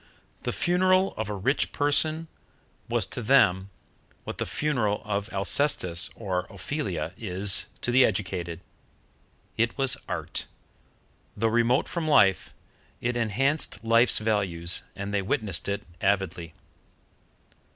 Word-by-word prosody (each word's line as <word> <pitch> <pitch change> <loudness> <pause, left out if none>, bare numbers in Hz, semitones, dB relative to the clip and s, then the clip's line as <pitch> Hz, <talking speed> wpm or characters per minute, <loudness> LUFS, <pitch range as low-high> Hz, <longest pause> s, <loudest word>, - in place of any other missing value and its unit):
The - - -2
funeral 185 +2 +2
of 110 -1 -4
a 105 - -3
rich 130 +9 0
person 155 +3 +2 0.6
was - - +1
to - - -6
them 100 -6 +3 0.5
what - - -7
the - - -2
funeral 120 -9 -1
of 100 0 -2
Alcestis 95 - +1
or 95 -4 -3
Ophelia 95 - -4
is 95 -2 +3
to 120 - -1
the 130 +1 +6
educated. 90 -5 -2 1.0
It 115 0 0
was 135 -2 +3
Art; - - -4 0.9
though 115 +2 +1
remote 120 +3 +2
from 170 -3 -3
life, 100 -11 +4 0.5
it 120 0 -2
enhanced 120 +1 -1
life's 115 +2 +4
values, 95 -6 +1
and 100 +1 -5
they 100 - +1
witnessed 100 -1 -1
it 100 +1 -2 0.2
avidly. 90 -4 -1
105 Hz, 120 wpm, -26 LUFS, 95-130 Hz, 1.0 s, the